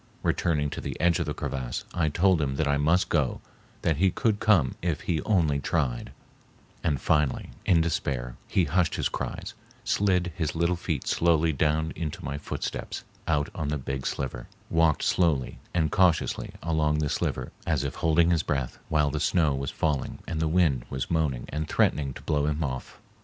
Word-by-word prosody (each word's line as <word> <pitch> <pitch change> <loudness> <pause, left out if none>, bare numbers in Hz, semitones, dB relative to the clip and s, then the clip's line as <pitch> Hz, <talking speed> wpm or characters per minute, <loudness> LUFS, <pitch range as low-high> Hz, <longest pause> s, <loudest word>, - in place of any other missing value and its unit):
Returning 75 -4 +1
to - - -5
the - - -5
edge 85 -1 +3
of - - -1
the - - -1
crevasse, 65 -3 -3
I 80 -3 +1
told 90 +2 +3
him 70 -2 -1
that 75 +1 0
I 70 0 +2
must 80 +6 +3
go, 75 -6 +1 0.4
that 80 -3 +2
he 95 +4 +4
could 105 +3 0
come 85 - +4
if 85 -3 -1
he 80 -4 -1
only 80 -9 +2
tried, 70 -6 -1 0.7
and 70 -4 +1
finally 75 0 +1 0.2
in 85 -3 +5
despair 65 -7 -2
he 95 - +2
hushed 80 +2 +1
his - - 0
cries, - - -4 0.3
slid 90 -3 +1
his 80 -3 -2
little 85 +2 +2
feet 80 -5 -3
slowly 80 -1 +3
down 80 +2 +1
into 80 -2 -4
my 70 +1 -3
footsteps - - -4 0.2
out 75 -1 +1
on 75 - -3
the 75 0 0
big 65 0 -4
sliver, 65 -3 -4 0.2
walked 80 -3 +3
slowly 80 -8 +1
and 80 -4 +1
cautiously 90 -4 +2
along 80 -2 +1
the 75 -1 +1
sliver - - -2 0.2
as - - +1
if 70 -1 -2
holding 85 +1 +3
his 85 -3 +3
breath, 65 -6 -2
while 75 -2 +2
the 75 - -2
snow 75 0 +2
was 70 0 -2
falling 75 -5 -1
and 80 - -2
the 80 - +1
wind 80 -7 +2
was 65 +2 -3
moaning 75 -7 0
and 75 +2 -3
threatening 70 -3 +2
to - - -10
blow 75 -1 +1
him 75 +2 0
off. 65 -3 -5
75 Hz, 185 wpm, -27 LUFS, 70-85 Hz, 0.7 s, in